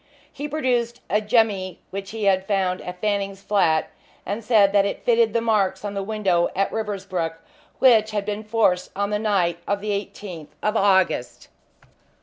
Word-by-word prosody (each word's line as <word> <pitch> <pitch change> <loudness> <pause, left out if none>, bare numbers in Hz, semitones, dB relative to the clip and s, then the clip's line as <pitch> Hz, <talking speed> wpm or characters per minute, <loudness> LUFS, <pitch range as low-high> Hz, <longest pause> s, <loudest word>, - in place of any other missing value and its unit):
He 290 +1 -5
produced 250 -5 -1
a 210 - +3
jemmy 210 -4 +1
which 195 0 -5
he 220 -1 -5
had 190 -1 +2
found 190 -3 0
at 180 0 -8
Fanning's 200 -1 -2
flat, 170 -7 +2 0.3
and 205 +4 -4
said 210 -3 +4
that 200 -1 +5
it 200 - -4
fitted 230 -2 +4
the 230 +1 0
marks 210 -4 +1
on 205 - -3
the 200 - -2
window 195 -4 +1
at 195 +1 0
Riversbrook 190 -6 -3 0.4
which 225 -4 +5
had 205 -2 -2
been 210 +1 -3
forced 210 -5 +1
on 200 +1 -1
the 210 - 0
night 185 -6 +1
of 200 0 0
the 210 +1 -3
18th 185 -6 -6
of 210 +1 0
August. 190 - +1
200 Hz, 170 wpm, -23 LUFS, 190-215 Hz, 0.4 s, that